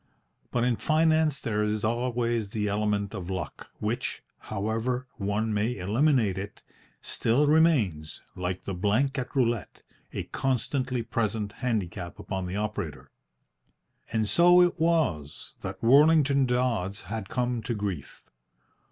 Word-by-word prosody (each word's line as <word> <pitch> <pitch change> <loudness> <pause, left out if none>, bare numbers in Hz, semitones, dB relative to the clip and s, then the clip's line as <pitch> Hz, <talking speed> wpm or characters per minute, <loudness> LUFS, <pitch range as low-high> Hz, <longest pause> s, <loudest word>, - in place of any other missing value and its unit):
But 120 - 0
in 120 -2 +2
finance 155 -2 +2
there 105 -4 -1
is 105 0 -1
always 120 -1 0
the 105 0 -2
element 105 0 0
of 95 -3 -6
luck, 95 -4 -5
which, - - -3 0.2
however 115 +5 -2
one 105 +1 -1
may 105 +3 0
eliminate 110 0 +2
it, 100 +1 -8 0.4
still 125 +6 +1
remains, 140 - +2 0.2
like 90 0 -3
the 100 - -4
blank 110 +10 +1
at 125 - -6
roulette, 120 -5 0 0.3
a - - -3
constantly 130 -1 -1
present 110 -2 -1
handicap 105 -7 -3
upon 95 -2 -4
the 90 - -4
operator. 105 +1 -4 1.0
And 110 -1 +1
so 175 - +6
it 175 -2 +2
was 150 - 0
that 95 +2 -6
Worlington 140 +1 +5
Dodds 115 -6 0
had 100 +1 -6
come 120 -1 -1
to 120 +1 -3
grief. 95 -9 -5
115 Hz, 130 wpm, -27 LUFS, 100-130 Hz, 1.0 s, so